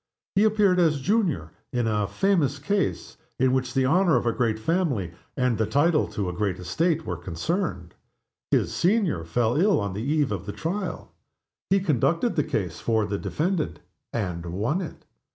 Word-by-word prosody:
He 200 +2 +4
appeared 205 -4 +3
as 155 -4 +3
"Junior" 170 - 0 0.2
in 120 -1 0
"a 105 -2 +1
famous 145 - +1
case," 195 +8 -1 0.2
in 130 0 +3
which 130 0 -1
the 135 -1 +3
honor 170 +3 +4
of 120 - +1
a 120 - +3
great 115 -3 0
family, 130 - 0 0.3
and 125 -4 +1
the 110 - +2
title 150 +7 +3
to 100 -3 -3
a 90 - -3
great 100 +1 -1
estate 160 - 0
were 90 - -3
concerned. 90 - -3 0.6
His - - +1
"Senior" 180 - +1
fell 115 - 0
ill 200 +1 +4
on 100 -2 -2
the 105 - -4
eve 145 +1 +1
of 100 -1 -4
the 100 - -4
trial. 180 0 -4 0.6
He 195 +1 +4
conducted 165 - +1
the 150 - +2
case 90 -10 -3
for 110 -2 +1
the 100 0 -3
defendant 170 0 -1 0.3
and 90 -6 -3
won 110 - -1
it. 175 - -8
130 Hz, 175 wpm, -25 LUFS, 105-175 Hz, 0.6 s, He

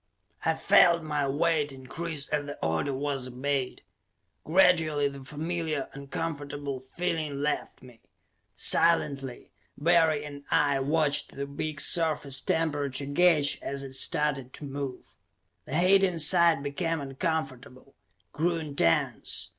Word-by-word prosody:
I 160 - +1
felt 170 -3 +5
my 150 -2 -1
weight 150 +1 +1
increase 140 +3 -6
as 145 -1 -1
the 145 - -7
order 80 - 0
was 135 -1 -3
obeyed; 130 +1 -3 0.6
gradually 160 -4 +3
the 140 -1 -8
familiar, 155 0 -3
uncomfortable 145 -1 -5
feeling 155 +2 -3
left 150 -3 -3
me. 125 -3 -16 0.5
Silently, 140 -6 +2 0.3
Barry 160 -2 +3
and 145 -1 -9
I 140 -2 +2
watched 145 +1 0
the 140 - -3
big 145 +1 -5
surface 145 -5 +2
temperature 145 -4 -1
gauge 150 0 +3
as 140 0 -4
it 135 -1 -8
started 135 -1 0
to - - -10
move. 140 -2 -6 0.5
The 140 - -3
heat 190 +3 +5
inside 170 -3 +4
became 165 +3 -2
uncomfortable, 135 -2 -4 0.4
grew 170 +3 0
intense. 140 - -1
145 Hz, 120 wpm, -28 LUFS, 140-165 Hz, 0.6 s, felt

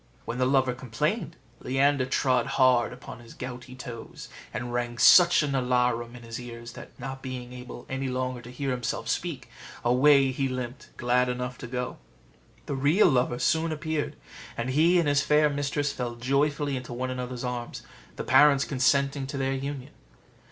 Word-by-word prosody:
When 120 +2 -4
the 125 - +3
lover 130 -2 +2
complained, 150 - -2 0.2
Leander 135 0 +1
trod 130 -2 +1
hard 130 -2 +4
upon 125 -1 -10
his 115 -1 -14
gouty 125 0 -8
toes, 120 -3 -9 0.2
and 120 +2 -5
rang 120 -1 -2
such 175 - +7
an 145 -2 -1
alarum 125 -2 0
in 120 - -11
his 115 0 -6
ears, 120 -1 -8
that, - - -12
not 135 +1 -6
being 125 -2 -6
able 125 -1 -9
any 135 0 -3
longer 130 -1 -2
to 120 - -11
hear 135 +2 -3
himself 125 -1 -3
speak, 150 -9 -3 0.4
away 135 +2 +5
he 135 +1 -1
limped, 125 0 -6
glad 125 +1 +2
enough 125 0 -4
to 120 - -7
go. 125 +1 -4 0.7
The - - -3
real 145 +9 +4
lover 125 -3 +1
soon 160 +5 +1
appeared, 155 -1 -3 0.4
and 120 +2 -2
he 165 +6 +4
and 170 -3 +2
his 145 0 +3
fair 150 +1 +3
mistress 145 0 -1
fell 120 -2 -4
joyfully 140 +3 0
into 125 -1 -6
one 130 +1 -3
another's 125 -1 -5
arms, 125 -1 -5 0.3
the - - -4
parents 145 -2 +5
consenting 140 +1 +1
to 140 - -5
their 135 0 0
union. 135 0 -5
130 Hz, 175 wpm, -27 LUFS, 125-140 Hz, 0.7 s, such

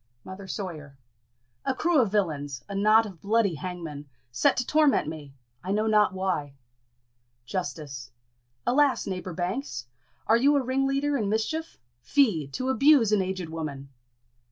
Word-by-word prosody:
Mother 190 +1 -9
Sawyer. 155 -9 -6 0.7
A 265 - -1
crew 330 -2 +3
of 220 -5 0
villains 150 -9 -1
a 200 - -7
knot 215 +3 +4
of 190 -6 -10
bloody 210 -2 +2
hangmen! 160 -4 -7 0.2
set 120 - +2
to 250 - 0
torment 300 - +3
me! 150 -3 -8 0.3
I 190 - -3
know 210 +2 +1
not 210 -1 +4
why. 185 -7 -2 0.9
Justice. 145 -6 -5 0.6
Alas, 280 +1 +3
neighbour 185 -2 -4
Banks! 180 - -3 0.4
are 225 - +4
you 280 +5 +4
a 280 - +2
ringleader 275 +2 0
in 210 -5 -1
mischief? 315 +10 -2 0.2
Fie! 210 - +2
to 255 - -3
abuse 265 -4 +5
an 210 -2 +3
aged 185 -3 -3
woman! 145 -4 -6
195 Hz, 145 wpm, -27 LUFS, 160-250 Hz, 0.9 s, abuse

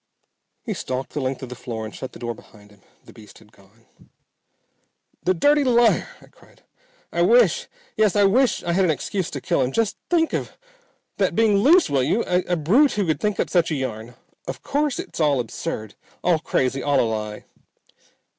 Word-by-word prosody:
He - - -3
stalked 130 +1 -4
the 145 - -3
length 130 0 -3
of 130 - -7
the 125 - -7
floor 115 -2 -6
and 110 - -8
shut 130 - -7
the - - -10
door 120 0 -4
behind 105 -2 -18
him. 100 -1 -22 0.2
The - - -15
beast 105 -1 -15
had 105 - -20
gone. 100 +3 -24 1.4
"The 185 +2 +1
dirty 290 - +3
liar!" 240 -3 +3
I - - -17
cried. - - -23 0.5
"I - - -1
wish - - +4 0.3
yes 215 -3 +2
I 205 - +4
wish 240 +6 +3
I 170 - -1
had 190 +2 +2
an 180 - +2
excuse 165 +5 -2
to 140 - -5
kill 135 - 0
him. 130 0 0
Just 225 +5 0
think 330 -2 +2
of - - -4 0.6
that - - 0
being 220 -3 +3
loose, 315 - +5
will 140 -2 +1
you? 165 - +1
A 180 0 0
brute 220 - +3
who 205 -2 0
would 160 -2 0
think 210 -2 -1
up - - -1
such 175 -3 +2
a 160 - -1
yarn! 120 -3 -5 0.3
Of 135 0 -6
course 290 -1 -1
it's - - -7
all 145 -4 +2
absurd. 110 -2 -5 0.3
All 175 -3 +3
crazy. 135 -3 -1
All 145 -2 +2
a - - +3
lie." 105 -1 -5
155 Hz, 200 wpm, -22 LUFS, -, 1.4 s, loose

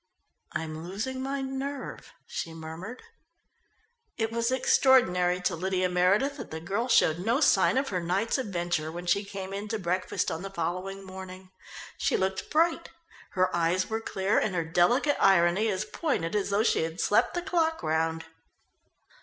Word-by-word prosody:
"I'm 160 0 -4
losing 215 +9 -4
my 270 +1 -2
nerve," 270 +1 -5
she 165 -1 -5
murmured. 165 +9 -8 1.1
It 225 -1 -1
was 230 0 0
extraordinary 190 -9 +3
to 180 - 0
Lydia 185 +1 0
Meredith 195 +11 +2
that 250 - -7
the 160 - -5
girl 200 +8 -2
showed 165 -9 +4
no 230 +8 +1
sign 285 -3 +4
of 270 +1 0
her 185 - -1
night's 190 +9 0
adventure 175 -8 -2
when 175 +2 -7
she 190 +4 +2
came 195 -1 -7
in 200 +2 -4
to 220 - -2
breakfast 185 -1 -1
on 160 - -4
the 195 - -5
following 190 +2 -4
morning. 185 0 -10 0.5
She - - +1
looked 190 0 -2
bright. 335 +2 +1 0.4
Her 185 -1 +1
eyes 175 +4 +1
were 220 0 -1
clear 195 -1 0
and 195 -4 -1
her 170 -2 0
delicate 180 - +2
irony 190 +2 +4
as 190 -2 -1
pointed 210 - -2
as 205 -1 0
though 200 +2 +2
she - - +2
had 165 +2 -4
slept 230 +8 +2
the 350 - 0
clock 325 - 0
round. 160 +1 0
190 Hz, 165 wpm, -28 LUFS, 175-235 Hz, 1.1 s, showed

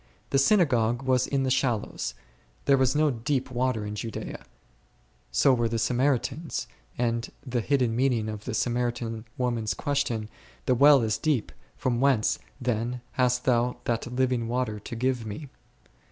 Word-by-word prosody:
The 135 - +4
synagogue 135 - +3
was 130 -1 +2
in 135 -1 0
the 130 - 0
shallows, 120 -5 -1 0.5
there 140 - +5
was 130 0 +2
no 150 0 +3
deep 130 +2 -2
water 125 -3 0
in 105 - -4
Judea; 110 +1 -6 0.9
so 60 - +4
were 120 -2 +1
the 115 - -1
Samaritans, 130 +5 0 0.3
and 115 0 0 0.2
the 125 -2 -1
hidden 125 -2 +1
meaning 120 -3 +1
of 105 -1 -6
the 120 - -3
Samaritan 120 -1 -1
woman's 120 -4 -1
question, 140 -7 -1 0.4
the - - +3
well 140 0 +6
is 110 -1 0
deep, 145 -8 0 0.3
from 120 -1 0
whence 135 -6 +3 0.2
then 120 0 -1
hast 125 -1 +1
Thou 125 -1 +2
that 120 +1 -2
living 125 -2 0
water 120 -3 -1
to 110 - -7
give 125 0 0
me 110 +7 -7
125 Hz, 155 wpm, -27 LUFS, 115-130 Hz, 0.9 s, well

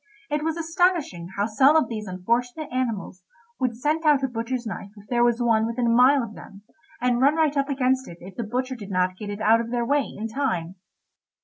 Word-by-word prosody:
It 295 0 0
was 320 +1 -1
astonishing 330 - 0
how 200 - +2
some 265 +7 +4
of 320 - +4
these 215 -3 -5
unfortunate 240 - -2
animals 230 -7 -3 0.4
would 245 -3 -1
scent 300 +5 0
out 295 -3 +4
a - - +2
butcher's 240 +1 -3
knife 200 -1 -6
if 205 0 -15
there 240 -1 +2
was 240 0 +2
one 225 -1 +3
within 235 +1 -1
a - - +2
mile 260 +2 +5
of 220 -2 -7
them, 200 -1 -13 0.4
and 245 0 +1
run 280 +3 +4
right 310 -2 +2
up 275 0 0
against 260 -1 +1
it 170 - -10
if 185 +2 -11
the - - -4
butcher 255 +4 -2
did 210 -5 -9
not 185 -1 0
get 205 +2 -7
it 205 +1 -5
out 225 +2 +4
of 230 - -6
their 240 0 -1
way 285 +3 +1
in 220 +2 -3
time. 215 -9 -2
240 Hz, 225 wpm, -24 LUFS, 215-275 Hz, 0.4 s, mile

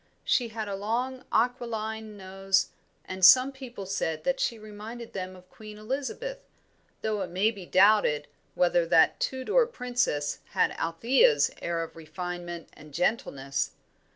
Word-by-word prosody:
She 245 - +2
had 220 -1 -5
a 200 - -4
long, 240 +6 -2
aquiline 220 -2 -1
nose, 195 0 0 0.4
and 185 0 -7
some 255 +9 +8
people 255 -7 -9
said 160 -5 -2
that 270 0 0
she 230 - 0
reminded 215 +2 -9
them 185 -1 -5
of 180 0 -16
Queen 215 -1 -11
Elizabeth, 280 - -4 0.6
though 215 -2 -1
it 185 - -3
may 190 +5 +2
be 195 -5 -10
doubted 185 -7 +4 0.3
whether 175 -1 +2
that 165 -1 +4
Tudor 265 - +1
princess 245 - -1
had - - +3
Althea's 165 - +3
air 170 -1 -1
of 165 - -9
refinement 175 +1 -6
and 150 -1 -14
gentleness. 140 - -1
205 Hz, 140 wpm, -28 LUFS, 175-235 Hz, 0.6 s, some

